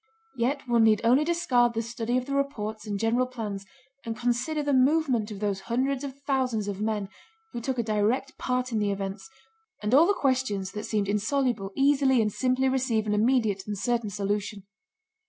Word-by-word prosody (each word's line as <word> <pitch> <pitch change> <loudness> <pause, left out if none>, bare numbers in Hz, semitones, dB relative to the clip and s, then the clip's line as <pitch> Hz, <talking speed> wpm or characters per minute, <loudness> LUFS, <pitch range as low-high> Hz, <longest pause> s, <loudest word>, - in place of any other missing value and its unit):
Yet 265 +3 -1
one 235 -2 +4
need 220 -1 +4
only 250 +6 +4
discard 260 -8 +2
the 225 - 0
study 235 +1 -2
of 255 - -2
the 280 - -4
reports 220 -6 -2
and 205 -1 -2
general 235 +3 +1
plans 210 -6 -5 0.4
and 225 -1 -5
consider 245 +6 -1
the 285 -1 0
movement 260 -4 +2
of 205 -2 -8
those 200 -2 -1
hundreds 260 +3 0
of 275 -1 -7
thousands 255 -7 0
of 200 0 -4
men 215 -2 -1 0.5
who 235 - -4
took 260 +2 -2
a 235 - +1
direct 220 +5 0
part 255 0 -1
in 220 - 0
the 205 -1 +1
events, 195 - -4 0.5
and 210 +3 -2
all 310 +6 +7
the 405 - +2
questions 255 - 0
that 210 +2 -5
seemed 210 -2 -1
insoluble 215 0 0
easily 275 -2 +3
and 210 -2 +1
simply 260 +1 +1
receive 255 -4 +1
an 210 - 0
immediate 215 -3 +1
and 205 -1 -3
certain 235 +1 -1
solution. 205 0 -3
235 Hz, 190 wpm, -27 LUFS, 210-265 Hz, 0.5 s, all